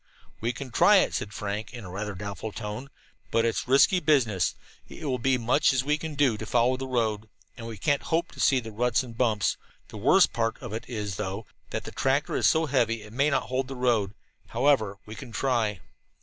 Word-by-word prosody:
"We 115 +2 0
can 125 +1 -8
try - - +6
it," - - +3
said 100 - -3
Frank 105 +2 -4
in 120 -4 -8
a 90 - -8
rather 100 +1 -4
doubtful 100 +3 -5
tone, 105 +7 -6 0.4
"but 115 0 +2
it's 115 +1 -1
risky 140 +8 +5
business. 120 - +2 0.3
It - - -9
will 130 -3 -1
be 130 +2 +2
as - - -2
much 135 +5 +3
as 130 -1 +1
we 150 +2 0
can 160 -1 -5
do 135 -6 +2
to 110 - -6
follow 120 +2 +3
the 130 +1 -5
road, 110 -4 -1 0.3
and 115 -2 -8
we 115 -2 -7
can't 140 +8 +1
hope 170 +2 -1
to - - -14
see 135 - +4
the 115 -2 -8
ruts 120 +3 +1
and 120 -2 -10
bumps. 110 -4 +1 0.3
The - - -9
worst 180 - +4
part 115 -2 0
of 120 -5 -7
it 115 +1 -5
is, 105 -5 -4
though, 100 +1 -4 0.2
that - - -4
the - - -8
tractor 135 +2 0
is - - +3
so 160 0 +3
heavy 115 -6 +1
it 105 +1 -13
may 140 +4 +2
not 140 - +1
hold 130 0 -2
the 135 - -6
road. 115 -5 +1 0.3
However, 115 -5 +2
we 105 - -9
can 125 +1 -9
try." 115 -5 0
120 Hz, 225 wpm, -27 LUFS, 105-135 Hz, 0.4 s, try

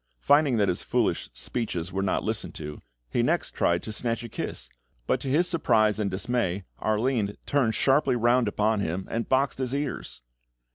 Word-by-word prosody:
Finding 145 - +4
that 100 -2 +3
his 90 - 0
foolish - - 0
speeches 90 - -3
were 95 - 0
not 95 -1 0
listened - - -2
to, 75 -1 -7 0.3
he - - +2
next - - 0
tried 85 0 +1
to 110 - -5
snatch 115 +2 -2
a 120 - -7
kiss, - - -5 0.4
but - - +1
to - - -6
his 165 +6 +3
surprise 110 - +2
and 105 -2 0
dismay, 100 -2 -1 0.2
Arline 110 -1 0
turned 130 -6 +1
sharply 135 -1 +3
round 120 0 +3
upon 105 +1 +1
him 95 0 -2
and 115 0 -2
boxed 135 +1 +2
his 130 0 0
ears! 140 - -4
110 Hz, 180 wpm, -27 LUFS, 100-130 Hz, 0.4 s, Finding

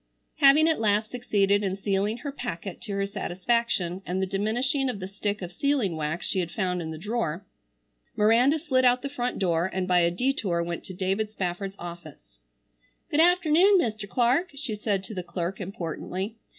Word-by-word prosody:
Having 295 +2 +6
at 320 - +2
last 215 0 +1
succeeded 205 -5 +1
in 190 -1 -1
sealing 200 +2 0
her 285 +3 -5
packet 195 -8 -6
to 210 - -5
her 200 0 0
satisfaction 195 -1 -1
and 185 0 -2
the 190 - +1
diminishing 240 +8 0
of 210 - -4
the 185 - -5
stick 200 +1 -3
of 175 - -6
sealing 255 - 0
wax 155 +2 -3
she 190 - 0
had 175 -2 -1
found 180 -1 -1
in 160 - -5
the 160 - -6
drawer, 200 -2 -2 0.7
Miranda 235 +8 +4
slid 270 -5 +1
out 250 0 +4
the 280 - -3
front 250 -3 -3
door, 175 -1 +1
and 185 -1 -2
by 180 -1 +4
a 170 0 +4
detour 190 -4 0
went 170 0 -4
to 185 - -8
David 195 +3 -1
Spafford's 195 -1 -4
office. 155 - -10 0.7
"Good 295 - +2
afternoon, 355 +3 +5
Mr. 215 - -1
Clark," 255 - +2
she 275 -5 -4
said 205 -2 -1
to 195 - -7
the 185 - -3
clerk 175 +2 -4
importantly. 190 +3 -4
200 Hz, 185 wpm, -26 LUFS, 180-245 Hz, 0.7 s, Having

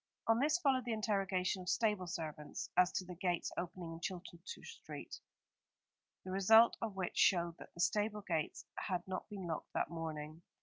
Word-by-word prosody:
On 225 0 +4
this 300 +5 +4
followed 270 -7 +2
the 235 - 0
interrogation 195 -3 0
of 180 - -4
stable 210 -4 +2
servants, 155 -4 -5
as 180 0 +5
to 185 - -1
the 180 - -7
gates 175 -1 -1
opening 175 -1 -4
into 185 -2 -2
Chilton 170 +2 -9
Street, 460 - -8 1.1
the 185 - -4
result 220 +5 +7
of 220 -4 -2
which 185 -2 -2
showed 170 -3 +4
that - - -11
the 170 - -3
stable 210 +3 +1
gates 165 -6 -2
had 180 -3 -2
not 185 +3 -4
been 200 -3 -5
locked 160 -2 -4
that - - 0
morning. 160 -1 -5
185 Hz, 175 wpm, -37 LUFS, 170-210 Hz, 1.1 s, result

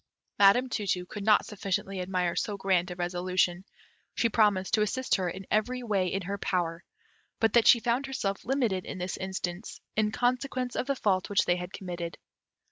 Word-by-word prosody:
Madam 205 +6 +6
Tu 215 -5 -3
tu 180 -1 0
could 205 +2 -7
not 215 0 +4
sufficiently 195 -1 -3
admire 180 -1 -1
so 205 -2 -2
grand 190 -2 +1
a 180 - -5
resolution; 175 0 0 0.5
she 230 - +2
promised 205 -4 +2
to 215 - +4
assist 255 +5 0
her 185 -3 +2
in 190 +2 -7
every 245 +4 0
way 200 -5 +1
in 190 +2 -2
her 200 +3 -4
power; 170 -3 -1 0.6
but 225 -2 +2
that 235 -2 +5
she 240 - +8
found 240 +4 0
herself 200 -7 -3
limited 235 -8 0
in - - -6
this 180 +1 -3
instance, 190 0 -5 0.2
in 215 0 +2
consequence 250 +1 -1
of - - -2
the 275 - +1
fault 190 -6 0
which 205 - +3
they 175 - +2
had 180 0 -6
committed. 175 -4 -6
195 Hz, 190 wpm, -29 LUFS, 180-225 Hz, 0.6 s, she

